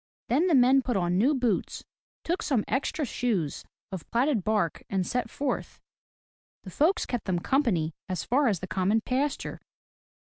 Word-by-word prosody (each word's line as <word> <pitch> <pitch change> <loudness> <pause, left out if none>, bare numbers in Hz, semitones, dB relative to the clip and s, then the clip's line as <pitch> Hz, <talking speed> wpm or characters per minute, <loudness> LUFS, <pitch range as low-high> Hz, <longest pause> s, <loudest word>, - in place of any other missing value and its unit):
Then 295 +9 +3
the 340 - +4
men 260 +1 +6
put 245 -4 -1
on 175 0 +1
new 275 +8 +3
boots, 245 -7 -1 0.4
took 345 +2 -1
some 245 -7 0
extra 280 +3 -1
shoes 210 - -1 0.3
of 190 -4 -7
platted 240 -3 +1
bark, 210 -6 0
and 190 -2 0
set 250 +4 -2
forth. 280 -2 -3 0.8
The 185 - -9
folks 315 - +2
kept 245 -3 -3
them 185 -3 0
company 175 - +1 0.2
as 180 -6 -2
far 270 - +2
as 195 -7 0
the 185 - -5
common 195 +4 +1
pasture. 270 +5 -2
235 Hz, 165 wpm, -27 LUFS, 185-270 Hz, 0.8 s, men